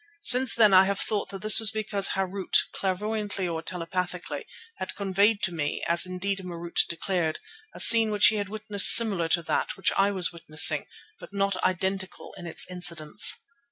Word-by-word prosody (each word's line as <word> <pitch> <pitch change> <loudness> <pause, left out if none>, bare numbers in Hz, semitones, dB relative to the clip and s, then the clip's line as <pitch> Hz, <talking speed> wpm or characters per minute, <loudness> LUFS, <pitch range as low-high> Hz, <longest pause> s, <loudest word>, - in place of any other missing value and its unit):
Since 255 -4 +2
then 215 -4 +4
I 190 +1 +6
have 200 0 -3
thought 210 -2 -3
that 195 0 -10
this 215 +1 +7
was 220 -2 +2
because 210 -2 -1
Harût, 190 0 +1 0.2
clairvoyantly 205 0 -4
or 165 -2 -5
telepathically, 180 +2 -6 0.3
had 185 - -7
conveyed 200 +2 0
to 175 - -1
me, 150 -3 -5
as 170 +2 +1
indeed 195 +2 -4
Marût 175 -2 -3
declared, 170 -2 -3 0.4
a - - -11
scene 225 -2 +6
which 210 -1 +4
he 220 - -3
had 205 -1 -5
witnessed 210 -1 +4
similar 200 -8 +1
to 170 0 0
that - - -3
which 190 - 0
I 195 +1 +1
was 185 -3 -1
witnessing, 160 -2 +2 0.3
but - - -14
not 195 -1 -1
identical 190 +1 -4
in 175 -2 -10
its 160 - -4
incidents. 175 0 +1
190 Hz, 175 wpm, -25 LUFS, 175-205 Hz, 0.4 s, this